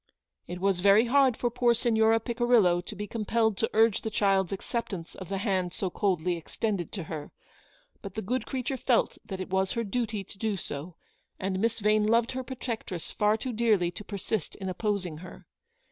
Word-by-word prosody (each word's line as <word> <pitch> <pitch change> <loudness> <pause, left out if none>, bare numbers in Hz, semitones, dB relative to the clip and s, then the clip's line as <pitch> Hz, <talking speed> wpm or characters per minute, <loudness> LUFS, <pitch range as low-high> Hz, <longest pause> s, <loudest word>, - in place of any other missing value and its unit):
" - - -51
It 180 - -6
was 195 -1 +1
very 200 +4 +6
hard 260 -1 +4
for 240 - 0
poor 240 0 +3
Signora 225 -1 +3
Picirillo 230 -7 +3
to 210 - -7
be 205 +1 -4
compelled 220 0 0
to 225 - 0
urge 220 -1 +4
the 220 - -3
child's 195 -3 +2
acceptance 195 -3 -4
of 185 - -9
the 195 - -1
hand 190 -4 0
so 190 -2 -2
coldly 180 -4 0
extended 190 +2 -3
to 190 - -3
her, 155 -2 -6 0.7
but 195 -2 -8
the 220 - -3
good 245 +4 -2
creature 265 0 -2
felt 250 -1 +1
that 190 -2 -6
it 185 - -5
was 190 0 +1
her 230 - -1
duty 220 -1 -2
to 195 - -14
do 215 -3 -1
so, 155 +1 -6 0.4
and 190 0 -1
Miss 225 +2 +1
Vane 210 0 +3
loved 230 +1 +3
her 260 - -3
protectress 235 -8 -5
far 210 +1 +2
too 255 +2 -4
dearly 215 -6 +2
to 195 - -8
persist 205 -2 -3
in 190 -2 -5
opposing 185 -4 -2
her. 180 +3 -11
210 Hz, 195 wpm, -28 LUFS, 185-230 Hz, 0.7 s, very